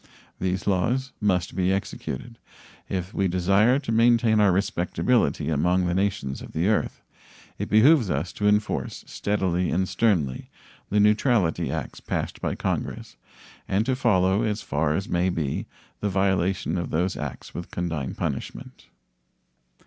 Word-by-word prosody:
These 95 Hz, +1 st, -1 dB
laws 115 Hz, +8 st, 0 dB
must 95 Hz, -5 st, 0 dB
be 95 Hz, 0 st, +1 dB
executed. 115 Hz, +4 st, -4 dB, 0.5 s
If 90 Hz, -1 st, -3 dB
we 100 Hz, -, +1 dB
desire 100 Hz, +7 st, +3 dB
to 140 Hz, -5 st, -4 dB
maintain 115 Hz, -1 st, +4 dB
our 105 Hz, -2 st, +5 dB
respectability 100 Hz, +3 st, +1 dB
among 90 Hz, +4 st, +2 dB
the 90 Hz, -, 0 dB
nations 95 Hz, -8 st, -1 dB
of -, -, -10 dB
the 85 Hz, +5 st, +1 dB
earth, 110 Hz, -, -1 dB, 0.6 s
it -, -, -3 dB
behooves 120 Hz, -, +5 dB
us 80 Hz, +3 st, -2 dB
to 105 Hz, -, 0 dB
enforce 105 Hz, 0 st, 0 dB
steadily 90 Hz, -3 st, -1 dB
and 95 Hz, +2 st, 0 dB
sternly 85 Hz, -, 0 dB, 0.4 s
the 105 Hz, -, +2 dB
neutrality 105 Hz, -, +2 dB
acts -, -, -5 dB
passed -, -, -4 dB
by -, -, -1 dB
Congress -, -, -3 dB, 0.5 s
and 100 Hz, +3 st, +1 dB
to 130 Hz, 0 st, +1 dB
follow 95 Hz, -5 st, +2 dB
as 110 Hz, -2 st, -1 dB
far 75 Hz, +1 st, 0 dB
as 95 Hz, -, -2 dB
may 90 Hz, +1 st, +1 dB
be 80 Hz, -6 st, -2 dB, 0.3 s
the 105 Hz, -, -1 dB
violation 95 Hz, -2 st, 0 dB
of 85 Hz, -, -4 dB
those 90 Hz, +4 st, 0 dB
acts 75 Hz, -4 st, -6 dB
with 85 Hz, -, -6 dB
condign 80 Hz, -6 st, -3 dB
punishment. 65 Hz, -, -5 dB
95 Hz, 145 wpm, -25 LUFS, 90-105 Hz, 0.6 s, our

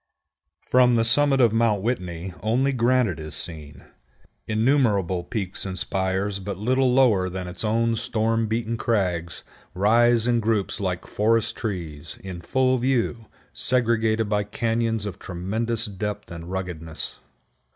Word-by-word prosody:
From 125 Hz, -1 st, +4 dB
the 115 Hz, -, +3 dB
summit 135 Hz, +4 st, +4 dB
of 120 Hz, -4 st, +4 dB
Mount 115 Hz, -4 st, +2 dB
Whitney 90 Hz, -6 st, -3 dB
only 130 Hz, +6 st, +1 dB
granite 120 Hz, -, +2 dB
is 75 Hz, -1 st, -5 dB
seen. 75 Hz, -4 st, -5 dB, 0.6 s
Innumerable 110 Hz, -6 st, +2 dB
peaks 95 Hz, -4 st, -4 dB
and 95 Hz, -1 st, -4 dB
spires 95 Hz, +2 st, -1 dB
but 100 Hz, -1 st, -5 dB
little 130 Hz, +5 st, +2 dB
lower 115 Hz, -8 st, +4 dB
than 90 Hz, 0 st, -5 dB
its 90 Hz, -, -6 dB
own 115 Hz, +1 st, +1 dB
storm 115 Hz, 0 st, 0 dB
beaten 115 Hz, +1 st, -2 dB
crags 90 Hz, -8 st, -1 dB, 0.3 s
rise 115 Hz, +4 st, +4 dB
in 120 Hz, -1 st, +2 dB
groups 110 Hz, -3 st, 0 dB
like 90 Hz, -3 st, -2 dB
forest 110 Hz, +1 st, +1 dB
trees, 85 Hz, -8 st, -5 dB
in 95 Hz, -3 st, -7 dB
full 130 Hz, +6 st, +1 dB
view, 120 Hz, -3 st, 0 dB, 0.3 s
segregated 115 Hz, -3 st, +1 dB
by 105 Hz, 0 st, +1 dB
cañons 115 Hz, +1 st, -1 dB
of 100 Hz, -4 st, -6 dB
tremendous 110 Hz, +6 st, -2 dB
depth 105 Hz, -1 st, -5 dB
and 85 Hz, 0 st, -8 dB
ruggedness. 90 Hz, -4 st, -5 dB
110 Hz, 135 wpm, -24 LUFS, 95-115 Hz, 0.6 s, From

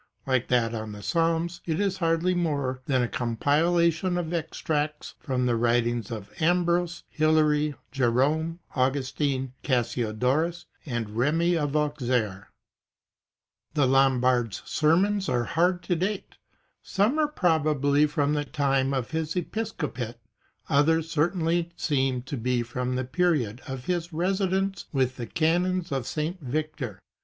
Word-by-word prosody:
Like 130 Hz, -2 st, +1 dB
that 120 Hz, -2 st, +2 dB
on 110 Hz, -2 st, -5 dB
the 105 Hz, 0 st, -9 dB
Psalms 165 Hz, -, 0 dB
it 160 Hz, +1 st, 0 dB
is 195 Hz, -2 st, 0 dB
hardly 165 Hz, +1 st, +1 dB
more 140 Hz, -7 st, -1 dB
than 130 Hz, -3 st, +2 dB
a -, -, 0 dB
compila 155 Hz, +9 st, +2 dB
tion 175 Hz, +3 st, -2 dB
of 175 Hz, -1 st, -3 dB
extracts 150 Hz, -2 st, -2 dB
from 125 Hz, -2 st, -1 dB
the 120 Hz, -1 st, +2 dB
writings 120 Hz, -1 st, +1 dB
of 110 Hz, -4 st, -7 dB
Ambrose, 175 Hz, 0 st, +1 dB
Hilary, 150 Hz, -1 st, +2 dB, 0.2 s
Jerome, 145 Hz, +7 st, +1 dB
Augustine, 130 Hz, 0 st, 0 dB
Cassiodorus 125 Hz, +6 st, 0 dB, 0.2 s
and 120 Hz, -5 st, -3 dB
Remi 160 Hz, +10 st, +2 dB
of 145 Hz, -3 st, -1 dB
Auxerre.^ 125 Hz, -9 st, 0 dB, 1.3 s
The 145 Hz, -3 st, +4 dB
Lombard's 125 Hz, -5 st, +2 dB
sermons 190 Hz, +6 st, +2 dB
are 120 Hz, -, +2 dB
very -, -, -7 dB
hard 175 Hz, +2 st, +2 dB
to 175 Hz, -, 0 dB
date. 190 Hz, +4 st, -3 dB, 0.5 s
Some 215 Hz, +10 st, +1 dB
are 305 Hz, -, +3 dB
probably 150 Hz, -, +2 dB
from 145 Hz, 0 st, 0 dB
the 145 Hz, -1 st, 0 dB
time 140 Hz, -2 st, 0 dB
of 130 Hz, -3 st, -3 dB
his 160 Hz, 0 st, -2 dB
episcopate, 155 Hz, -, -3 dB, 0.5 s
others 160 Hz, +2 st, +2 dB
certainly 170 Hz, +1 st, +1 dB
seem 130 Hz, -4 st, 0 dB
to 135 Hz, +2 st, -5 dB
be 125 Hz, +1 st, 0 dB
from 125 Hz, +2 st, -3 dB
the 130 Hz, 0 st, -1 dB
period 135 Hz, -, 0 dB
of 130 Hz, -2 st, -6 dB
his 175 Hz, -1 st, -1 dB
residence 190 Hz, +2 st, 0 dB
with 130 Hz, -3 st, 0 dB
the 120 Hz, -2 st, -5 dB
canons 175 Hz, +4 st, +1 dB
of 135 Hz, -3 st, -2 dB
St. 165 Hz, +3 st, -2 dB
Victor. 140 Hz, -5 st, -3 dB
150 Hz, 135 wpm, -26 LUFS, 125-170 Hz, 1.3 s, The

